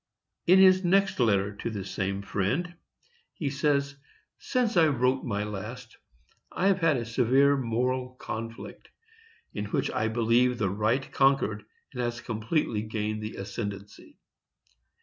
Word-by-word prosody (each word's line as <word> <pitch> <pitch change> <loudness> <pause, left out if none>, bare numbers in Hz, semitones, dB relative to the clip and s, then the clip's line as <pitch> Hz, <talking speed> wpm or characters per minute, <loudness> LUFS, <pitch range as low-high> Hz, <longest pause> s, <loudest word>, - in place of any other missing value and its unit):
In 185 +2 +7
his 185 0 +6
next 190 0 +2
letter 100 -4 +2
to - - -4
the 100 -4 -5
same 100 0 -3
friend 110 - -1 0.6
he 145 -4 -3
says: 140 0 0 0.4
Since 245 -4 0
I 165 -2 +6
wrote 130 -2 +1
my 105 -4 -2
last, 105 -2 -7 0.6
I 185 - -2
have 195 -1 +2
had 165 -5 +3
a 120 - -3
severe 130 +4 +3
moral 125 +1 -1
conflict, 115 -1 -7 0.6
in 105 - -3
which 105 - -1
I 110 - 0
believe 120 +2 +2
the 100 -5 0
right 110 +7 0
conquered, 135 -6 +2 0.3
and 125 - -3
has 120 0 -2
completely 115 0 -1
gained 110 0 -3
the 110 0 -6
ascendency. 100 0 -7
120 Hz, 140 wpm, -27 LUFS, 105-140 Hz, 0.6 s, In